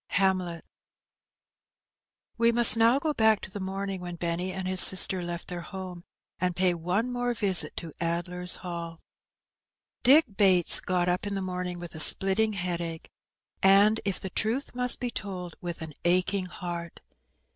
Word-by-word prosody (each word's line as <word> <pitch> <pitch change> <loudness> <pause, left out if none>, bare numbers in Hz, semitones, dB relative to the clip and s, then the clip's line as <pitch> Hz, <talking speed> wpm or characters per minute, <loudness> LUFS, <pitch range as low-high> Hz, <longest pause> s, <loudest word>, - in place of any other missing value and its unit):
Hamlet. 185 -3 -2 1.7
We 230 0 +1
must 235 -2 +7
now 230 +3 +2
go 300 +2 -3
back 220 -4 +2
to - - -11
the 205 - -8
morning 195 0 -6
when 175 -1 -8
Benny 170 +2 -4
and 190 0 -6
his 185 0 +5
sister 190 0 +7
left 175 0 -7
their 175 -1 -7
home, 180 -1 -10 0.3
and 180 -1 -2
pay 180 0 +1
one 180 +9 -3
more 245 0 -3
visit 195 -4 +2
to 165 -3 -8
" - - -15
Addler^s 175 +1 -2
Hall/' 170 -2 -8 1.0
Dick 290 +6 +5
Bates 185 -4 +5
got 180 -1 -2
up 180 +3 -2
in 200 - -5
the - - -4
morning 180 -1 -6
with 175 -1 -10
a 160 - -9
spUtting 200 +6 +5
headache, 170 -3 -6 0.5
and, 200 +3 +3
if 200 -2 -3
the 190 - -8
truth 230 +9 -3
must 250 0 +2
be 245 -1 -5
told, 180 -6 -8
with 175 -2 -7
an 155 -1 -9
aching 185 +2 -1
heart. 170 -1 -9
185 Hz, 165 wpm, -25 LUFS, 175-205 Hz, 1.7 s, must